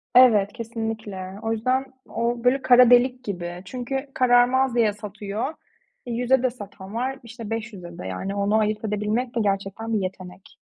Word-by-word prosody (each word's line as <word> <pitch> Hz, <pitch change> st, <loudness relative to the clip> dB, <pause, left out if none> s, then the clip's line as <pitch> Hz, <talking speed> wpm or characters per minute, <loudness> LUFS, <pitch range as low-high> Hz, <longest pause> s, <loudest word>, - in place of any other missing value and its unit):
Evet, 220 Hz, -6 st, +6 dB
kesinlikle. 220 Hz, -5 st, -5 dB
O 225 Hz, -, -1 dB
yüzden 255 Hz, +4 st, +1 dB, 0.2 s
o 235 Hz, 0 st, -1 dB
böyle 260 Hz, +2 st, +3 dB
kara 250 Hz, -1 st, +7 dB
delik 250 Hz, +1 st, +4 dB
gibi. 175 Hz, -3 st, -5 dB
Çünkü 265 Hz, +5 st, -4 dB
kararmaz 250 Hz, +1 st, +4 dB
diye 225 Hz, -3 st, +3 dB
satıyor. 210 Hz, +5 st, -5 dB, 0.5 s
E, 245 Hz, -, -5 dB
100'e 250 Hz, +2 st, +2 dB
de 255 Hz, -, +3 dB
satan 205 Hz, -4 st, -10 dB
var, 265 Hz, +3 st, -2 dB
işte, 230 Hz, -1 st, -9 dB
500'e 205 Hz, -7 st, -6 dB
de. -, -, -6 dB
Yani, 190 Hz, -, -4 dB
onu 200 Hz, +1 st, +1 dB
ayırt 215 Hz, 0 st, 0 dB
edebilmek 215 Hz, +4 st, -1 dB
de -, -, +1 dB
gerçekten 200 Hz, +3 st, -2 dB
bir 215 Hz, -, +2 dB
yetenek. 185 Hz, 0 st, -7 dB
225 Hz, 165 wpm, -24 LUFS, 200-245 Hz, 0.5 s, kara